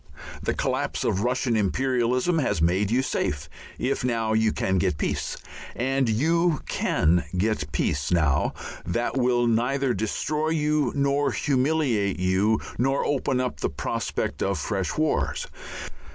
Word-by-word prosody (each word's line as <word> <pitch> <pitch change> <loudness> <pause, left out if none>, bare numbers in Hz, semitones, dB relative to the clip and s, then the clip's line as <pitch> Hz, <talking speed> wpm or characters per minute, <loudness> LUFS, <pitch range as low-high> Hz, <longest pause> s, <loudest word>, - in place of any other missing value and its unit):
The - - -1
collapse - - -1
of 95 - +1
Russian 125 0 +1
imperialism 125 - +1
has 130 - 0
made 90 +5 +2
you 125 +4 +2
safe 75 - -2 0.3
if 135 0 -1
now 115 -3 0
you 110 0 +3
can 95 0 0
get 90 -5 0
peace, - - -2 0.4
and 130 0 +1
you 160 +7 +2
can 85 +1 +2
get 110 +1 +1
a 75 - -4
peace 70 -1 -1
now 80 -6 +2 0.3
that 105 +11 -1
will 125 -2 +2
neither 125 +3 +1
destroy 150 +9 -1
you 150 -2 +1
nor 140 0 +2
humiliate 130 -8 +1
you 95 +4 +2 0.2
nor 135 +3 +1
open 135 -2 0
up 125 -1 -2
the - - 0
prospect - - -3
of 100 -1 0
fresh 95 +5 -2
wars. 155 -1 0
120 Hz, 140 wpm, -25 LUFS, 95-135 Hz, 0.4 s, you